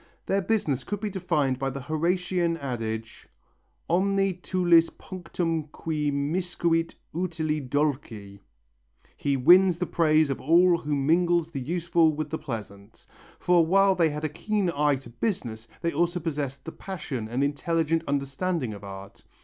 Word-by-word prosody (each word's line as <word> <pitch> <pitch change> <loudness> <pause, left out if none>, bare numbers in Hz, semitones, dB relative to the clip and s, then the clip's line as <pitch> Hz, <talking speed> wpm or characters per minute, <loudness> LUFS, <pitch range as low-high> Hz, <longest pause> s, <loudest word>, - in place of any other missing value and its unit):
Their 195 +1 +1
business 180 - 0
could 205 - -4
be 210 0 -3
defined 150 -8 0
by 135 0 -1
the 135 +1 -6
Horatian 170 +3 0
adage, 115 -5 -5 0.6
Omne 195 +1 +1
tulit 175 -3 +3
punctum 170 -3 -3
qui 150 -1 -2
miscuit 165 +3 0 0.2
utile 160 -3 -1
dulci 130 -9 -2 0.8
(he 140 -1 0
wins 175 +6 +6
the 180 - -1
praise 155 -3 +3
of 135 - -4
all 170 +3 +4
who 150 -1 -2
mingles 165 +3 +2
the 140 - -4
useful 170 +2 +2
with 155 0 -4
the 160 - -2
pleasant), 105 -5 -8 0.3
for 175 -1 +4
while 195 +4 +4
they 170 -3 +2
had 150 +1 -5
a - - 0
keen 195 +4 -1
eye 145 0 +3
to 130 -3 -10
business, 120 - -3 0.2
they 170 0 0
also 175 +3 +1
possessed 140 -5 -4
the 165 - -5
passion 150 - -6
and 125 +4 0
intelligent 160 +3 0
understanding 140 -1 -1
of 100 0 -10
art. 100 0 -10
160 Hz, 150 wpm, -26 LUFS, 140-175 Hz, 0.8 s, wins